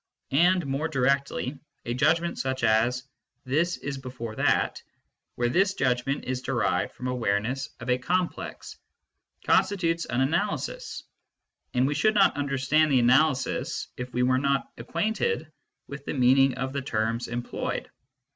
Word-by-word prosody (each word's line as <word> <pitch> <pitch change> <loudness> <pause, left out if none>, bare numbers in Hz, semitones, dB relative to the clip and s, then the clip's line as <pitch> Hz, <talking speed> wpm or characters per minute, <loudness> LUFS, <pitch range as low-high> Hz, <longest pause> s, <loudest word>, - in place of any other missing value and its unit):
And 175 +4 +4
more 140 +3 -1
directly: 140 -1 0 0.3
A 120 - -2
judgment 165 +6 +1
such 130 -1 -2
as 115 +3 +2 0.2
" - - -51
this 170 +4 +2
is 140 -1 -5
before 125 -4 -7
that," - - +1 0.5
where 120 - +1
this 190 +9 +2
judg 125 -2 0
ment 140 +1 -1
is 130 0 -2
derived - - 0
from 125 - -7
awareness 125 +3 -1
of 120 - -8
a 125 0 +2
complex, 180 +6 -3 0.7
constitutes 170 -4 +2
an 120 +1 -1
analysis, 205 - -2 0.7
and 125 +1 +3
we 145 - +1
should 215 +9 +2
not 195 -2 +5
understand 145 +2 +2
the 135 - +5
analysis 130 +3 +2
if 125 0 -6
we 125 0 0
were 130 +1 +3
not 140 0 0
acquainted 220 - -1 0.3
with 140 0 -8
the - - -3
meaning 130 +1 +4
of 130 +1 -3
the 140 - -2
terms 115 -1 -1
employed. 120 0 -4
135 Hz, 145 wpm, -27 LUFS, 125-160 Hz, 0.7 s, not